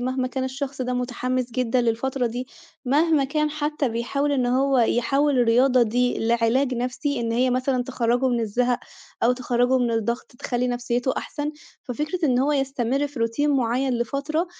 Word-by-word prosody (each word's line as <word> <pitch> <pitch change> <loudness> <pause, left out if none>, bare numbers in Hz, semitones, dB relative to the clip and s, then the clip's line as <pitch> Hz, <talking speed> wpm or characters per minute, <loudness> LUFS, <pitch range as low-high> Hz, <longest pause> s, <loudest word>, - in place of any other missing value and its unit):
مهما 255 +1 -1
كان 260 +1 -3
الشخص 265 0 -4
ده 250 0 -2
مُتحمس 250 0 -2
جدًا 250 0 +1
للفترة 245 +2 0
دي، 245 +2 -4 0.4
مهما 295 +2 +3
كان 300 +2 0
حتى 300 -2 -1
بيحاول 260 +5 -1
إن 255 -3 +1
هو 265 +1 +2
يحوّل 270 +4 +2
الرياضة 245 +2 +4
دي 245 +2 +1
لعلاج 235 +3 +2
نفسي، 250 +3 -2
إن 230 -1 -1
هي 250 +2 +2
مثلًا 255 0 0
تخرّجه 245 0 0
من 240 -1 0
الزَهق 245 +3 0 0.4
أو 240 - +4
تخرّجه 250 0 +1
من 240 -1 +1
الضغط 230 +1 -2
تخلّي 245 0 -1
نفسيّته 245 +1 -1
أحسن، 295 0 -4 0.3
ففكرة 305 +7 -3
إن 250 -3 +2
هو 280 +3 +2
يستمر 270 0 0
في 280 -4 -8
Routine 230 +6 +1
معيّن 260 -1 +1
لفترة، 280 +8 -1
255 Hz, 165 wpm, -24 LUFS, 240-275 Hz, 0.4 s, الرياضة